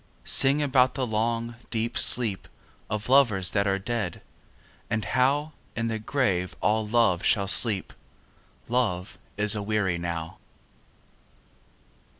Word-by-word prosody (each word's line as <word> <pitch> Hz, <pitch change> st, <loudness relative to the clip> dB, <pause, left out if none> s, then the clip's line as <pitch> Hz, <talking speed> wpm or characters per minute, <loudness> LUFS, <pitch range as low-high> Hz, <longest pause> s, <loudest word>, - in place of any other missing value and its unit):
Sing 140 Hz, +2 st, +5 dB
about 130 Hz, -2 st, +2 dB
the 130 Hz, -, -2 dB
long 115 Hz, +1 st, -3 dB
deep 115 Hz, 0 st, -3 dB
sleep 110 Hz, -6 st, +2 dB, 0.4 s
Of 105 Hz, 0 st, -4 dB
lovers 120 Hz, -9 st, +3 dB
that 100 Hz, -1 st, 0 dB
are 95 Hz, 0 st, 0 dB
dead, 105 Hz, -3 st, -5 dB, 0.7 s
and 110 Hz, -3 st, -2 dB
how 140 Hz, +8 st, 0 dB, 0.2 s
In 115 Hz, 0 st, -3 dB
the 110 Hz, -1 st, -4 dB
grave 100 Hz, -7 st, -2 dB
all 110 Hz, 0 st, 0 dB
love 105 Hz, -6 st, +1 dB
shall 100 Hz, -2 st, +1 dB
sleep: 100 Hz, 0 st, +5 dB, 0.7 s
Love 110 Hz, -7 st, -2 dB, 0.2 s
is 105 Hz, 0 st, +2 dB
aweary 100 Hz, -4 st, -2 dB
now. 85 Hz, -1 st, -6 dB
110 Hz, 120 wpm, -25 LUFS, 100-120 Hz, 0.7 s, Sing